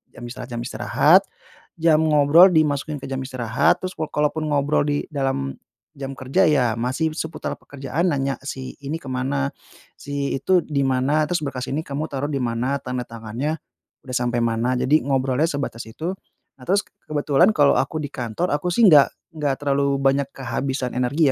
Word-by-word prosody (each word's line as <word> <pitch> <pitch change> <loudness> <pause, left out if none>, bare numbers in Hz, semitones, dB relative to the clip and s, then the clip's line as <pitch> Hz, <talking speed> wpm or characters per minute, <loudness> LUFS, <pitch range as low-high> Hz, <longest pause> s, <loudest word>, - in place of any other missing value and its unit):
jam 120 - -10
istirahat, 120 0 -7
jam 120 0 -3
istirahat, 145 +9 +4 0.6
jam 160 -1 +4
ngobrol 155 +4 +6
dimasukin 150 -2 +1
ke - - -7
jam 135 - -2
istirahat, 125 -4 +1
terus 185 0 -5
wo - - -2
kalaupun 150 +1 0
ngobrol 145 -1 +1
di 145 0 -1
dalam 135 - -2 0.4
jam 135 -1 -5
kerja, 135 +8 +1
ya, 130 -7 +3
masih 135 +7 -1
seputar 160 0 -4
pekerjaan, 140 +6 -2
nanya, 135 -1 0
"Si 135 -2 -6
ini 155 +4 -3
kemana? 135 +2 -1 0.5
Si 140 -1 -3
itu 180 +7 +3
di 140 -2 0
mana? 135 +3 +2
Terus 175 +3 -1
berkas 130 -3 -4
ini 140 - -1
kamu 150 -1 -4
taruh 140 +1 -2
di 145 - -1
mana? 120 +3 -1
Tanda 125 0 -3
tangannya 115 +7 -4 0.5
udah 125 -1 -5
sampe 120 0 0
mana?" 115 +2 0
Jadi, 145 +5 +3
ngobrolnya 135 +2 +1
sebatas 140 -6 -4
itu. 160 +10 -4 0.5
Nah, - - -13
terus 200 +3 +2 0.2
kebetulan 150 +4 +3
kalo 145 -2 +5
aku 160 - -1
di 145 - -5
kantor, 120 +8 -2
aku 150 +4 -3
sih 225 +6 +4
nggak 145 -3 +7 0.2
nggak 145 -4 -1
terlalu 140 0 +1
banyak 135 0 +2
kehabisan 130 0 -3
energi 135 +4 +2
140 Hz, 170 wpm, -22 LUFS, 130-150 Hz, 0.6 s, nggak